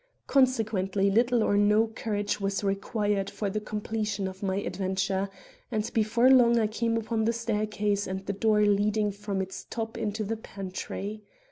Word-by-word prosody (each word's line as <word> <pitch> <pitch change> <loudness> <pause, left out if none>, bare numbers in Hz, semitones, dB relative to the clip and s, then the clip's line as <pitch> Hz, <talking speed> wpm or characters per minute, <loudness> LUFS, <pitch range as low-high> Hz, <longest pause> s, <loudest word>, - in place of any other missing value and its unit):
Consequently 215 -7 +2
little 235 +2 +3
or 205 - +2
no 210 +2 +4
courage 210 -2 -3
was 195 +1 -1
required 200 0 0
for 205 -2 -3
the 215 - -1
completion 210 -1 -3
of 190 0 -8
my 190 -2 0
adventure; 195 0 -1 0.4
and 215 -1 -1
before 230 +3 +4
long 240 -2 +6
I 220 - +2
came 230 +2 0
upon 225 0 -1
the 230 - +2
staircase 210 -3 -1
and 190 +1 -4
the 200 - -2
door 210 +1 +2
leading 210 +1 +2
from 200 -1 -3
its 190 0 -8
top 225 0 -4
into 215 -1 -2
the 225 +2 -2
pantry. 200 +1 -6
210 Hz, 160 wpm, -28 LUFS, 200-225 Hz, 0.4 s, long